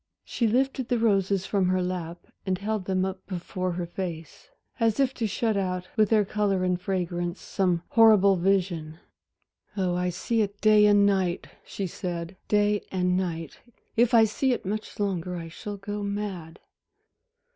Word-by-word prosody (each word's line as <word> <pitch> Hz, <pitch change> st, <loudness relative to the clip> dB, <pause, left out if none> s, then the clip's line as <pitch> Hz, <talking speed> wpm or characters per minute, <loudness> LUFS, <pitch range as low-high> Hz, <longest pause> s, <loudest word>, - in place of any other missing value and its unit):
She 235 Hz, -, 0 dB
lifted 260 Hz, +2 st, 0 dB
the 245 Hz, -, +2 dB
roses 195 Hz, -4 st, +1 dB
from 195 Hz, -3 st, +1 dB
her 185 Hz, 0 st, +1 dB
lap 175 Hz, -2 st, -5 dB, 0.2 s
and 190 Hz, -2 st, -1 dB
held 205 Hz, 0 st, -3 dB
them 185 Hz, 0 st, 0 dB
up 190 Hz, 0 st, -5 dB
before 185 Hz, 0 st, -3 dB
her 175 Hz, 0 st, -3 dB
face, 170 Hz, -3 st, -7 dB, 0.3 s
as 225 Hz, 0 st, +2 dB
if 265 Hz, -1 st, +2 dB
to 230 Hz, -4 st, -2 dB
shut 220 Hz, +2 st, 0 dB
out, 185 Hz, -2 st, -2 dB
with 215 Hz, -2 st, +3 dB
their 215 Hz, -2 st, +4 dB
color 195 Hz, -2 st, 0 dB
and 180 Hz, -1 st, 0 dB
fragrance, 175 Hz, -1 st, -2 dB
some 180 Hz, -4 st, 0 dB
horrible 215 Hz, -4 st, +6 dB
vision. 175 Hz, -4 st, 0 dB, 0.8 s
"Oh, 185 Hz, -2 st, +1 dB
I 180 Hz, 0 st, 0 dB
see 220 Hz, +6 st, -1 dB
it 205 Hz, -1 st, -3 dB
day 215 Hz, -1 st, +6 dB
and 205 Hz, -1 st, +5 dB
night," 190 Hz, -3 st, 0 dB
she 195 Hz, -, -5 dB
said, 175 Hz, 0 st, -5 dB
"day 210 Hz, 0 st, +2 dB
and 180 Hz, -1 st, +1 dB
night! 165 Hz, -4 st, -3 dB, 0.4 s
If 235 Hz, +1 st, +3 dB
I 225 Hz, -, +8 dB
see 250 Hz, +4 st, +1 dB
it 240 Hz, -, -5 dB
much 210 Hz, +3 st, -4 dB
longer, 185 Hz, -3 st, -2 dB
I 165 Hz, -1 st, -6 dB
shall 205 Hz, +5 st, -7 dB
go 205 Hz, +1 st, -5 dB
mad." 200 Hz, -5 st, -4 dB
195 Hz, 165 wpm, -26 LUFS, 180-210 Hz, 0.8 s, I